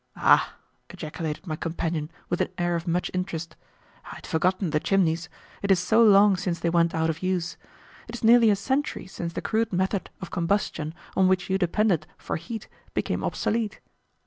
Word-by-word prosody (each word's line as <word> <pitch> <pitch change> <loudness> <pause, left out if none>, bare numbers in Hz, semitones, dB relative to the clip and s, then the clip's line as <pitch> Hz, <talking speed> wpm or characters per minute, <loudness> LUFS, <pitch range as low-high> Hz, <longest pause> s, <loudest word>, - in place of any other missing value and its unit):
"Ah!" - - +4 0.3
ejaculated 155 +2 -5
my 155 -4 -3
companion 165 -1 -3 0.2
with 175 - -1
an - - +2
air 175 -1 0
of 170 +1 -4
much 175 +1 0
interest, 170 -3 -3 0.6
"I - - -8
had - - -11
forgotten 185 +1 0
the 150 - +2
chimneys, 170 -2 +1 0.3
it 200 - -2
is 195 - +6
so 220 +6 +3
long 205 -3 +6
since 180 -2 -2
they 170 - 0
went 170 -1 +2
out 160 0 +2
of 155 - -9
use. 180 -2 -1 0.5
It 230 - -7
is 235 - -9
nearly 230 0 +7
a 205 - +4
century 265 +8 -1
since 170 -3 -6
the - - -4
crude 225 0 0
method 190 +1 -1
of 190 - -8
combustion 170 -3 -1 0.2
on 190 - +4
which 185 0 +1
you 190 - +2
depended 175 -3 +1
for - - -4
heat 220 +7 -7 0.3
became - - -1
obsolete." 220 -1 -1
180 Hz, 185 wpm, -26 LUFS, 165-200 Hz, 0.6 s, nearly